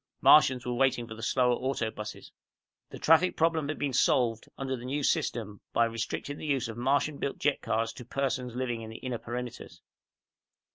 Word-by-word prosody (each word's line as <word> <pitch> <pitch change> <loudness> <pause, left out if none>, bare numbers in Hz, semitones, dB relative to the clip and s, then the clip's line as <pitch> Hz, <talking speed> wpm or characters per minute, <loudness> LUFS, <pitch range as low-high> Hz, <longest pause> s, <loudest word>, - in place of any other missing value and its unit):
Martians 130 -5 +6
were 125 - -1
waiting 125 -1 +2
for 115 - -8
the 110 - -10
slower 125 +1 +2
auto 120 -3 -1
buses. 105 -1 -8 0.6
The - - -8
traffic 165 +3 +4
problem 160 -2 +2
had 155 - -2
been 140 -2 -2
solved, 115 -2 +2
under 135 -1 -2
the 120 - -9
New 140 +3 -2
System, 105 -6 -1
by 115 - +4
restricting 115 +5 -4
the - - -6
use 135 -4 0
of 115 - -6
the - - -5
Martian 140 +3 +1
built 140 - -2
jet 145 0 +1
cars 115 0 -1
to 125 - -9
persons 125 -1 -2
living 120 -2 -2
in 110 - -7
the 110 - -8
inner 125 -3 -4
perimeters. 120 0 -6
125 Hz, 195 wpm, -29 LUFS, 115-140 Hz, 0.6 s, Martians